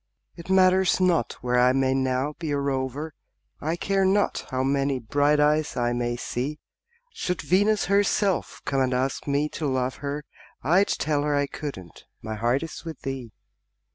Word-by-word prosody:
It 170 +1 -11
matters 190 0 +4
not 175 -9 +2
where 125 0 +1
I 125 +1 +5
may 130 0 +2
now 130 +2 0
be 165 -3 -4
a 145 - 0
rover, 140 +2 -2 0.5
I 160 +3 -1
care 195 +2 0
not 195 +2 +1
how 130 -2 -1
many 135 0 +1
bright 145 +5 +2
eyes 150 +1 +2
I 120 0 +1
may 120 0 -1
see; 130 +4 -3 0.6
Should 180 - -3
Venus 205 +3 +2
herself 200 -1 +1
come 135 -1 +1
and 130 -1 +1
ask 130 +3 -1
me 145 +1 +1
to 150 - -3
love 130 -1 -1
her, 145 +1 -4 0.4
I'd 180 +8 +4
tell 150 -1 0
her 145 0 0
I 145 0 +2
couldn't 135 - -8
my 110 0 -6
heart 120 +6 0
is 165 - -7
with 165 -4 -8
thee. 130 -4 -5
145 Hz, 170 wpm, -25 LUFS, 130-165 Hz, 0.6 s, I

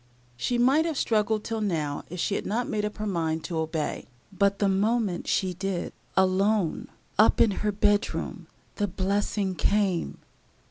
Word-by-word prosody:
She 240 - -1
might 270 +7 +4
have 320 -4 -2
struggled 215 -2 +1
till 225 -1 -3
now 155 -8 -2
if 180 +2 -6
she 200 - 0
had - - -2
not 235 +4 -1
made 210 -1 -1
up 210 - -5
her 215 - -3
mind 165 -5 -1
to 165 -3 -3
obey; 160 -1 -3 0.3
but, 200 +1 +2
the 200 - +2
moment 200 -1 +1
she 185 -1 +1
did 190 0 -3 0.2
alone, 190 0 +2 0.3
up 215 - +5
in 220 - +5
her 210 - +1
bedroom, 205 0 0 0.3
the 205 - +1
blessing 195 +1 -1
came. 190 +1 0
200 Hz, 165 wpm, -27 LUFS, 180-215 Hz, 0.3 s, up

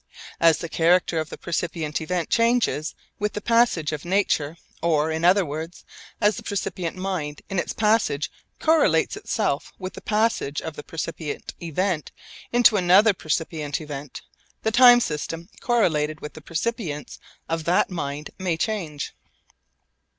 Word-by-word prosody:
As 165 -2 +5
the 170 - -5
character 170 +1 +3
of 155 -1 -3
the - - -8
percipient 165 -3 -2
event 175 +1 -2
changes 230 -9 +2 0.2
with 210 0 -1
the - - -3
passage 230 -9 +2
of 150 -2 -4
nature 170 -4 +1 0.2
or, 160 -2 +2
in 160 +1 -2
other 185 +2 +5
words, 160 +4 -6 0.3
as 210 -1 +3
the - - -5
percipient 185 -3 -3
mind 185 -6 -4
in 195 - 0
its - - -2
passage 210 -9 +1 0.3
correlates 320 0 +3
itself - - -1
with 185 -1 -6
the - - -9
passage 215 -9 0
of 160 -2 -6
the - - -6
percipient 160 -1 -5
event 170 0 -1 0.4
into 240 -3 +5
another 195 +4 +6
percipient 155 -3 -2
event 145 -3 -7 0.4
the 220 - +1
time 245 +1 +8
system 165 +1 -3
correlated 155 -11 +1
with 150 - -8
the 155 - -11
percipience 165 -3 -3 0.3
of 165 -1 -2
that 180 +2 +2
mind 150 -3 -4
may 180 -3 0
change. 165 -8 -3
170 Hz, 145 wpm, -24 LUFS, 155-205 Hz, 0.4 s, time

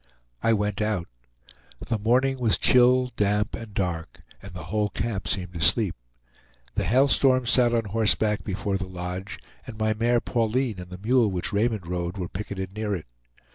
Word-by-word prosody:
I 115 - +3
went 105 -1 -1
out. 105 -5 -1 0.8
The 115 -2 -1
morning 130 +5 +2
was 115 -4 +2
chill, 125 0 +4
damp, 105 0 +1
and 115 -2 -7
dark; 90 -5 -3 0.2
and 100 - -10
the 90 -2 -8
whole 105 +5 -1
camp 100 -3 -3
seemed 90 -1 -2
asleep. 80 -4 +2 0.8
The - - -1
Hail 130 +5 +4
Storm 130 -2 +3
sat 120 0 +4
on 115 -2 +1
horseback 105 0 +1
before 100 0 -2
the 95 -1 -5
lodge, 90 +3 -6 0.3
and 115 -4 -8
my 110 0 +1
mare 120 +2 +2
Pauline 115 -2 -1
and 90 0 -9
the 90 - -8
mule 115 +3 +2
which 90 0 -2
Raymond 105 -2 0
rode 85 +1 -3
were 90 -2 -3
picketed 95 0 -6
near 105 -1 -2
it. 80 - -7
105 Hz, 175 wpm, -25 LUFS, 95-115 Hz, 0.8 s, chill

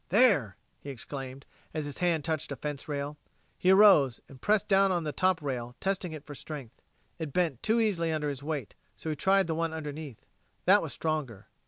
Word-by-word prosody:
"There!" 195 - +4 0.2
he 145 - -9
exclaimed, 135 0 -7 0.3
as 155 -2 -1
his 145 -2 -6
hand 170 -4 +1
touched 160 -3 -2
a - - -2
rail - - -23
fence. 145 0 -4 0.4
He 180 - +2
arose 190 - +7
and 130 -2 -14
pressed 210 +3 +2
down 195 -1 +4
on 175 -2 0
the 150 - -2
top 185 +2 +1
rail, 125 -3 -3
testing 190 -3 -1
it 155 -2 -8
for 150 - -8
strength. 140 -4 -8 0.4
It 155 -4 -4
bent 165 -9 0
too 225 +2 +2
easily 180 -7 +1
under 150 -2 -1
his 140 -1 -5
weight, 145 -6 -4 0.2
so 160 - -4
he - - -2
tried 195 +5 +3
the 165 - -1
one 165 0 -1
underneath. 150 -5 -7 0.4
That - - +6
was - - -5
stronger. 150 -10 -3
155 Hz, 200 wpm, -29 LUFS, 140-180 Hz, 0.4 s, arose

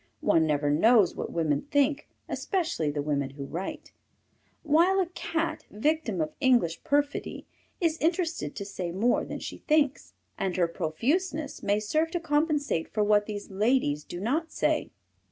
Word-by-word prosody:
One 160 -1 +3
never 145 -1 +1
knows 205 +5 +5
what - - -4
women 160 - 0
think, 285 +1 +1 0.2
especially 340 - -1
the 145 0 -2
women 140 -2 -1
who 140 0 -7
write, 175 +7 -6 0.7
while 335 +5 +4
a 375 - +3
Cat, 330 -2 -3
victim 225 - 0
of 155 - -2
English 245 - +2
perfidy, 285 0 -1 0.3
is 325 -2 +1
interested 330 - -1
to 200 - -5
say 185 -3 -4
more 215 +8 +2
than - - -5
she - - -7
thinks, 300 -3 +1 0.2
and 190 -1 -1
her 175 -2 +3
profuseness 280 - -1
may 205 +1 +1
serve 310 +10 0
to 350 - 0
compensate 295 - 0
for 210 0 +1
what 210 0 +3
these 205 -1 -6
ladies 195 - +1
do 175 - -7
not 295 - -1
say. - - 0
230 Hz, 155 wpm, -28 LUFS, -, 0.7 s, knows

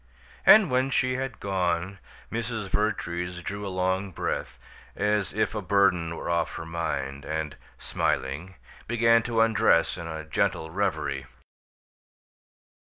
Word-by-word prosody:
And 215 -8 +8
when 130 +1 +2
she 130 0 +1
had 130 -4 -4
gone 95 0 -1 0.3
Mrs. 115 -3 -3
Vertrees 90 -4 -1
drew 100 0 -4
a - - -3
long 95 +1 0
breath, 90 - -3 0.4
as 105 -1 +1
if 110 +2 0
a 105 - -2
burden 90 -3 +2
were - - -6
off 85 -1 0
her - - -6
mind, 70 -4 -3
and, 80 -2 -3 0.2
smiling, 80 +9 -2 0.3
began 115 0 +4
to 115 -1 +1
undress 110 -7 +3
in 85 - -6
a 80 -1 -5
gentle 80 +1 0
reverie. 100 +3 -1
95 Hz, 130 wpm, -27 LUFS, 85-110 Hz, 0.4 s, And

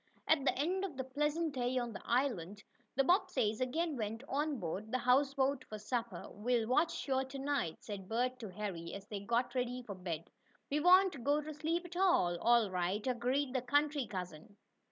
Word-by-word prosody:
At 315 -3 +4
the 275 - +2
end 360 +7 0
of 320 -9 -5
a - - 0
pleasant 295 +4 -1
day 250 -1 0
on 240 -2 -1
the - - -7
island, 210 -7 0 0.3
the 275 - +4
Bobbseys 255 - +2
again 315 +5 0
went 225 +1 -3
on 290 -1 -1
board 190 +4 -4
the 255 - +2
houseboat 265 +2 +2
for 215 - -5
supper. 225 -3 -3
"We'll 230 +2 0
watch 305 +7 +3
sure 265 -1 0
to 265 +1 -8
night," 275 - -1
said 195 -3 -7
Bert 250 +3 0
to 220 -4 -6
Harry, 180 -4 -5
as 195 0 -8
they 210 -1 -5
got 235 +4 0
ready 250 -1 -2
for 210 - -6
bed. 170 -3 -5 0.4
"We 295 - +2
won't 360 -4 +5
go 290 +3 +3
to 305 +1 -6
sleep 325 +4 -1
at 350 0 -9
all." 265 - +3
"All 235 -1 +4
right," 185 +3 -1
agreed 255 +2 0
the 260 - +1
country 285 0 +1
cousin. 180 +1 -7
250 Hz, 195 wpm, -35 LUFS, 210-285 Hz, 0.4 s, won't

